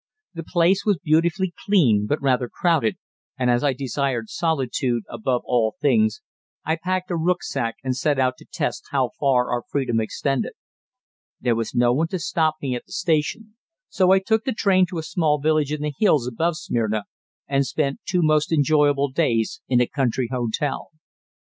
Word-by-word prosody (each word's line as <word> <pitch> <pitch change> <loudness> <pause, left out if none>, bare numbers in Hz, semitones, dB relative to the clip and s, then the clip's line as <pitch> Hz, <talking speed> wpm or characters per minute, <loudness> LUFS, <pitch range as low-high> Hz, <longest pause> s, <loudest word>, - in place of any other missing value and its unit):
The 165 -1 -6
place 175 +3 +2
was 205 -4 +2
beautifully 170 +5 +1
clean 120 - +3
but 145 - +1
rather 125 -2 +1
crowded, 160 - +1 0.4
and 125 -1 +2
as 120 +2 +1
I 140 -2 +2
desired 130 -2 -2
solitude 130 -7 -1
above 120 +2 -2
all 115 -3 +1
things, 220 - +2 0.4
I 160 +1 0
packed 185 0 -2
a - - 0
rücksack 165 -8 -1
and 130 -1 -1
set 145 +2 0
out 130 -1 +1
to - - -16
test - - -3
how 130 -4 0
far 130 -3 +2
our 120 0 0
freedom 125 -5 0
extended. 135 +4 -2 0.9
There 120 -1 +1
was 115 0 -3
no 120 0 +4
one 160 +6 +1
to 185 - -3
stop 160 -2 0
me 135 -2 -1
at 120 - -6
the - - -20
station, 195 +4 -1 0.4
so 185 -2 +2
I 190 - +7
took 220 +3 +1
the 260 -1 -1
train 190 -4 +3
to 175 -1 -6
a 160 - -3
small 160 -3 +1
village 155 -1 +1
in 150 -1 -3
the 150 -1 -2
hills 155 - +3
above 155 +7 -1
Smyrna 110 -5 -1 0.4
and 140 0 +2
spent 140 -3 -1
two 180 -2 +2
most 155 0 +2
enjoyable 145 -2 +3
days 115 -9 0
in 125 -2 +3
a 125 - +4
country 125 -2 -1
hotel. 125 +3 -2
145 Hz, 180 wpm, -23 LUFS, 125-170 Hz, 0.9 s, I